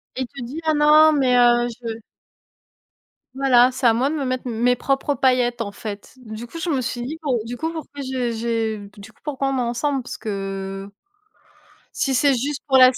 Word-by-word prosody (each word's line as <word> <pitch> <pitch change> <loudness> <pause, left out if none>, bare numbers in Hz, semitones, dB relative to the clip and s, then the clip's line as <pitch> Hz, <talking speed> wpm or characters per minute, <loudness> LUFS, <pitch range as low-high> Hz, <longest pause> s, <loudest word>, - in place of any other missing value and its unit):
Et 260 - -3
il 260 - -2
te 275 -1 -9
dit: 285 +7 -6
«Ah 315 -1 +2
non, 305 +1 +6
mais, 265 -4 +3
heu, 240 0 +5
je» 230 -1 -3 1.4
Voilà, 255 -2 +5
c'est 255 -1 +1
à 225 - +5
moi 265 +4 +1
de 315 - -2
me 280 - -2
mettre 255 0 -2
mes 240 +1 +2
propres 275 +3 0
paillettes, 245 -2 +2
en 205 -3 -3
fait. 200 0 -8
Du 220 +1 -7
coup, 330 +8 -9
je 340 - -2
me 275 -5 +1
suis 240 0 -3
dit: 295 +6 -5
«Bon, 255 -5 +1
du 245 +1 -6
coup 320 +3 -2
pourquoi 295 -3 -7
j'ai 255 -2 -2
j'ai 225 -1 -1 0.2
du 200 +2 -12
coup - - -32
pourquoi 275 -2 -2
on 270 - -1
est - - +1
ensemble?» 250 +3 -1
Parce - - -7
que 195 -1 -5 1.0
si 270 - 0
c'est 280 +2 +4
juste 280 +4 -2
pour 265 - +5
la 255 -1 +9
s 255 - -4
250 Hz, 215 wpm, -22 LUFS, 235-275 Hz, 1.4 s, la